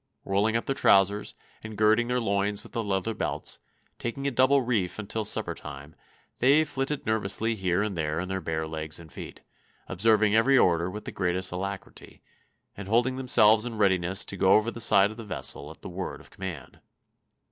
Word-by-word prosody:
Rolling 105 +4 +1
up 115 - -4
their 135 - -1
trousers, 100 -4 +2 0.3
and 110 -1 -8
girding 110 +2 +3
their 125 0 0
loins 100 -2 -1
with - - -14
their 115 - -2
leather 100 +1 -2
belts, - - -2 0.4
taking 130 +4 -4
a 140 - +1
double 130 +2 +3
reef 110 -7 -1
until 110 +1 -3
supper - - +1
time, 70 +1 -10 0.5
they 140 +5 +5
flitted 135 +1 -3
nervously 110 +1 +1
here 95 -2 0
and 105 -3 -3
there 80 -1 -2
in 90 - -4
their 95 0 -3
bare 80 -1 -3
legs 80 0 -4
and 80 -2 -14
feet, - - -9 0.5
observing 105 +2 +2
every 130 +5 +4
order 85 -4 +2
with 105 +3 -8
the - - -5
greatest 90 0 -1
alacrity, 95 +2 -7 0.5
and 100 -1 -8
holding 120 +4 +1
themselves 110 -4 +4
in 120 -2 -5
readiness 95 -2 +2
to 100 - -4
go 95 0 +4
over 110 +2 +3
the 115 - -6
side 100 -2 +5
of 110 - -12
the 115 - -7
vessel 85 -7 -2
at 80 - -14
the - - -6
word 90 +1 -6
of - - -17
command. 90 -8 -8
105 Hz, 190 wpm, -27 LUFS, 95-115 Hz, 0.5 s, they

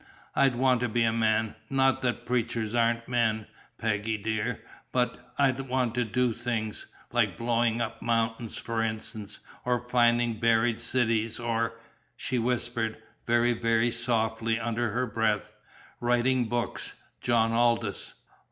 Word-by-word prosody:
I'd 135 -2 +4
want 125 -1 +3
to 125 - 0
be 115 +1 +2
a 115 -1 +2
man, 110 -1 +1 0.2
not 135 -1 +3
that 120 -1 -1
preachers 115 -2 -1
aren't 115 0 +1
men, 115 -3 +1 0.3
Peggy, 110 0 -1
dear 110 +2 -2 0.3
but 125 0 -1
I'd 135 -2 +3
want 125 -3 +1
to 125 0 +1
do 120 +2 +1
things, 115 -2 -3 0.2
like - - +1
blowing 115 0 +1
up 115 -1 -4
mountains 115 0 -1
for 115 -1 -2
instance, 110 -1 -4 0.2
or 125 -1 0
finding 120 -2 +3
buried 115 0 +3
cities, 115 -2 0
or" 115 -1 -1 0.4
she 125 - -1
whispered, 120 -1 -1 0.3
very, 120 +1 +3
very 115 0 +2
softly 115 -1 0
under 115 0 -1
her 125 +5 0
breath 110 -2 0 0.5
"writing 120 +1 +2
books, 120 -1 -2 0.3
John 115 -2 +3
Aldous!" 115 -2 +1
115 Hz, 135 wpm, -28 LUFS, 110-120 Hz, 0.5 s, I'd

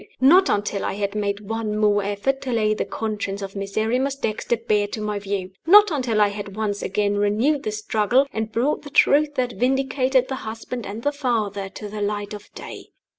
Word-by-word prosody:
not 350 +9 +6
until 205 -1 0
I - - -1
had 200 0 -2
made 205 -1 -2
one 220 -1 -2
more 210 -1 +3
effort 205 +7 -1
to 260 - -4
lay 215 -2 +2
the - - -2
conscience 205 -2 -4
of 195 0 -7
Miserrimus 220 +7 -1
Dexter 235 -2 -1
bare 210 -2 +1
to 210 - -6
my 210 -1 -2
view! 195 -2 -4 0.2
not 410 +2 +8
until 250 -7 0
I 205 -1 +5
had 200 -1 -7
once 210 -2 -2
again 205 +1 0
renewed 220 +9 +2
the 215 - -3
struggle, 215 +4 +1
and 220 0 -3
brought 255 +7 0
the 290 - -10
truth 290 +1 +4
that 250 -2 -1
vindicated 260 0 +2
the 265 - -3
husband 225 +1 -6
and 210 +4 -6
the 290 - +2
father 220 -8 -2
to 210 +2 -8
the 210 0 -6
light 205 0 -2
of 210 -1 -10
day! - - -9
215 Hz, 200 wpm, -23 LUFS, 205-255 Hz, 0.2 s, not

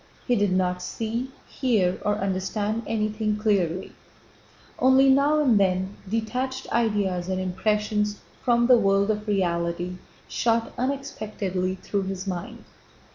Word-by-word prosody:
He 245 - +2
did 205 -3 +2
not 180 -1 +1
see, 230 +6 -3 0.2
hear, 205 -9 +1
or 205 0 +1
understand 205 +2 -1
anything 215 -1 -1
clearly. 190 -5 0 0.9
Only 265 +1 +5
now 285 +3 +4
and 245 -8 +4
then 190 0 +1
detached 255 +5 -2
ideas 200 -6 0
and 185 0 -1
impressions 210 +3 0 0.2
from 240 -1 +3
the 245 -1 +6
world 200 0 +3
of 210 0 -4
reality 175 -2 -1 0.3
shot 230 -1 0
unexpectedly 215 -8 -2
through 195 +1 -3
his 190 0 -4
mind. 180 -3 -5
210 Hz, 125 wpm, -25 LUFS, 185-230 Hz, 0.9 s, the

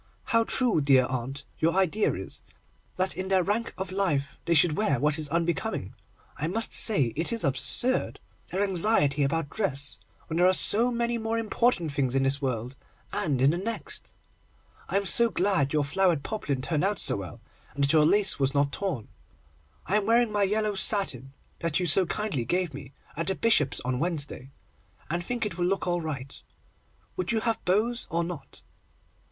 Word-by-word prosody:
How 230 -3 +1
true, 240 - +3
dear 135 -3 +4
aunt, 130 +2 -5 0.2
your 165 +2 +1
idea 190 +3 +1
is, - - -7 0.6
that 185 +1 0
in 185 +1 -4
their 190 -1 +2
rank 215 +5 -1
of 190 -1 -5
life 150 -8 -1
they 170 0 +1
should 155 0 +4
wear 155 - 0
what 150 +3 +1
is 150 -2 -3
unbecoming. 170 - -2 0.4
I 155 - -2
must 225 +6 0
say 140 - +4
it 165 +7 0
is 230 -1 -2
absurd, 140 - +3 0.3
their 190 +3 -2
anxiety 175 -7 +2
about 145 +1 -1
dress, 140 - -2 0.3
when 160 - -4
there 180 +1 +4
are 185 - +3
so 230 +6 +4
many 235 -1 -2
more 225 +1 -2
important 225 -6 0
things 135 -2 -1
in 135 - +2
this 135 +1 +1
world, 125 -1 -3 0.4
and 135 -5 0
in 140 - +5
the 170 - -3
next. 225 +4 -5 0.7
I - - +1
am 200 - -1
so 235 +4 +3
glad 185 -9 +1
your 150 -1 +1
flowered 165 +1 +1
poplin 140 -12 -4
turned 150 +2 -1
out 200 +1 0
so - - 0
well, 95 -3 -8 0.4
and 140 - -1
that 140 +2 +2
your 155 -1 +5
lace 200 +4 +4
was 135 +1 0
not 140 0 +1
torn. 170 - -4 0.8
I 205 - +2
am 210 -1 -2
wearing 235 0 +3
my 205 -1 0
yellow 210 +1 +1
satin, 190 - 0 0.3
that 170 -1 -1
you 180 - -1
so 175 +3 +7
kindly 200 - -2
gave 175 +5 -1
me, 140 0 -10 0.2
at 165 +1 -3
the 190 - -1
Bishop's 170 -13 +2
on 125 0 -3
Wednesday, 150 -5 -3 0.6
and 175 +1 -2
think 240 +4 -3
it 185 -4 -6
will 175 - +1
look 195 +1 -1
all 175 -1 -1
right. 140 -4 -6 0.8
Would 185 +2 -2
you 225 -1 0
have 225 -1 -1
bows 220 +6 0
or 170 +1 -1
not? 170 -4 -9
170 Hz, 190 wpm, -26 LUFS, 140-205 Hz, 0.8 s, so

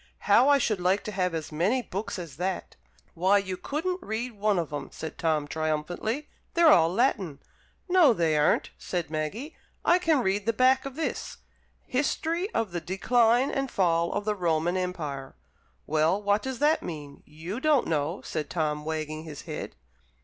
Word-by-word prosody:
"How 235 +7 +6
I 285 - +6
should 215 -8 0
like 185 +3 +2
to 215 - -5
have 180 -3 -1
as 160 -1 -5
many 195 +12 +1
books 200 0 -4
as 165 -6 -8
that!" 185 +1 -3 0.4
"Why, 190 +4 +3
you 190 -2 -2
couldn't 350 - -3
read 225 +4 -3
one 210 -2 0
of 165 -3 -2
'em," 145 -2 -4
said 160 - -7
Tom, 155 -3 +1
triumphantly. 160 - -2 0.3
"They're 335 -2 +7
all 165 0 +4
Latin." 195 - 0 0.5
"No, 355 -6 +6
they 165 -7 +1
aren't," 150 0 +2
said 175 -4 -3
Maggie. 180 - -4 0.3
"I 350 +2 +5
can 320 -7 +2
read 200 +2 0
the 230 - +3
back 260 +3 +3
of 270 - -9
this... 320 - -3 0.5
'History 325 +7 -1
of 225 - -1
the 175 -1 -3
Decline 235 +7 +2
and 275 -1 -1
Fall 170 -4 +1
of 205 0 -2
the 215 - +1
Roman 175 -2 0
Empire.'" 155 -8 -4 0.5
"Well, 155 +5 +2
what 205 0 +1
does 265 -1 -4
that 300 +4 +3
mean? 145 -4 -7
You 165 +9 -6
don't 295 -2 +3
know," 155 +3 -1
said 155 -2 -4
Tom, 150 -3 -1
wagging 155 0 -3
his 150 -3 -8
head. - - -6
190 Hz, 175 wpm, -27 LUFS, 160-250 Hz, 0.5 s, They're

